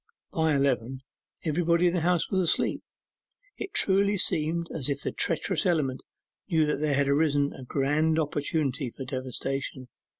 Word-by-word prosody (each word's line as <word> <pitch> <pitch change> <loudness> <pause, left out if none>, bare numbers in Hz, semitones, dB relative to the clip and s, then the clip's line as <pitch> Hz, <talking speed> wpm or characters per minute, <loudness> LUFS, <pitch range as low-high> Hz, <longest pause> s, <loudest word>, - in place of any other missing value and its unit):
By 160 -2 +1
eleven, 130 -2 0 0.4
everybody 170 +2 +2
in 175 - +3
the 180 - +1
house 175 0 +1
was 190 -1 +2
asleep. 170 - +1 0.8
It 390 - -6
truly 200 +1 +3
seemed 170 -1 +1
as 150 -3 -1
if 140 0 -2
the - - -2
treacherous 170 0 0
element 145 -7 0 0.5
knew 160 -4 +3
there 150 -2 0
had 140 0 +2
arisen 145 0 +2
a 135 - -10
grand 150 +5 +1
opportunity 145 -3 -1
for 135 - -5
devastation. 130 0 -4
150 Hz, 145 wpm, -27 LUFS, 135-170 Hz, 0.8 s, in